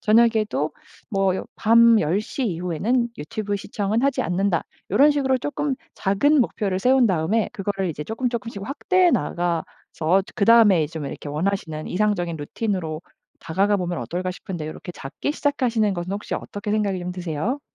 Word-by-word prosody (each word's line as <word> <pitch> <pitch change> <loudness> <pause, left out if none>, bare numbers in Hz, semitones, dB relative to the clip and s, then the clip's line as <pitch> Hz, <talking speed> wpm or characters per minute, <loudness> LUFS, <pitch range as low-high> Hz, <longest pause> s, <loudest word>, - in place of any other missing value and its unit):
저녁에도 215 -8 +3 0.4
뭐 195 -2 +1
밤 230 0 +6
10:00 205 - -1
이후에는 185 +7 0
유튜브 205 +6 -3
시청은 205 +3 -2
하지 275 -1 +2
않는다.' 180 0 0 0.3
요런 275 +10 +6
식으로 265 -2 +1
쪼끔 290 0 -2 0.2
작은 280 +10 +3
목표를 200 -5 0
세운 255 +2 +4
다음에 190 +4 +1
그거를 195 -1 -2
이제 150 -2 -4
쪼끔 235 +6 -2
조금씩 230 -4 -5
확대해 365 - +2
나가서 170 +1 -1
그다음에 205 -7 +5
좀 160 -3 -5
이렇게 145 - -7
원하시는 160 -1 -2
이상적인 180 -4 0
루틴으로 160 0 -3 0.4
다가가 195 +5 +1
보면 175 -5 -2
어떨까 175 +10 -3
싶은데 175 -4 -6
요렇게 155 +3 -7
잡기 135 - -4
시작하시는 245 -9 +1
것은 175 0 -4
혹시 205 - -4
어떻게 205 +1 -4
생각이 205 -3 0
좀 180 0 -4
드세요? 180 - -3
200 Hz, 370 characters per minute, -23 LUFS, 175-230 Hz, 0.4 s, 밤